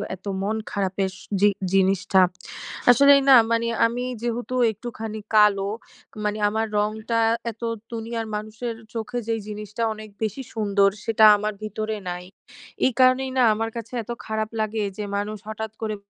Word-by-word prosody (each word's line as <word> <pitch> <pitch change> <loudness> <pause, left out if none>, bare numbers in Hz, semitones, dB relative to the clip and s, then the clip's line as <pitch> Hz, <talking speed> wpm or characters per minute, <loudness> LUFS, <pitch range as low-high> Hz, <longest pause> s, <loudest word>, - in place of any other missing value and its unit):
এতো 190 +2 -8
মন 215 +2 0 0.2
খারাপের 195 -1 -1
স - - -14 0.2
যে 205 - +7 0.2
জিনিসটা। 190 0 +3 0.7
আসলেই 280 +3 +7
না 270 - +9 0.2
মানি, 230 0 +1 0.2
আমি 245 +2 -3 0.2
যেহেতু 240 +1 -3 0.2
একটুখানি 220 0 -6
কালো, 200 -2 +5 0.6
মানি 210 +1 -1
আমার 220 +2 -1
রংটা 220 +2 0 0.3
এতো 230 +1 -6 0.3
দুনিয়ার 225 0 -4
মানুষের 215 +2 -5 0.2
চোখে 240 +2 -3
যেই 225 -1 0
জিনিসটা 210 +1 -5
অনেক 215 0 -10
বেশি 220 +5 -2
সুন্দর 200 -2 +3 0.2
সেটা 220 -1 +4
আমার 210 +1 -2
ভিতরে 215 +1 -3
নাই। 180 0 -5 0.6
এই 260 - +2
কারণেই 255 +1 +4
না, - - +5
আমার 225 +1 -2
কাছে 230 +1 -7
এতো 240 +2 -5
খারাপ 220 0 -2
লাগে। 215 0 -1
যে 210 - -4
মানুষ 210 +1 -3
হঠাৎ 220 0 -5
করে 215 -1 -1
220 Hz, 155 wpm, -24 LUFS, 210-230 Hz, 0.7 s, না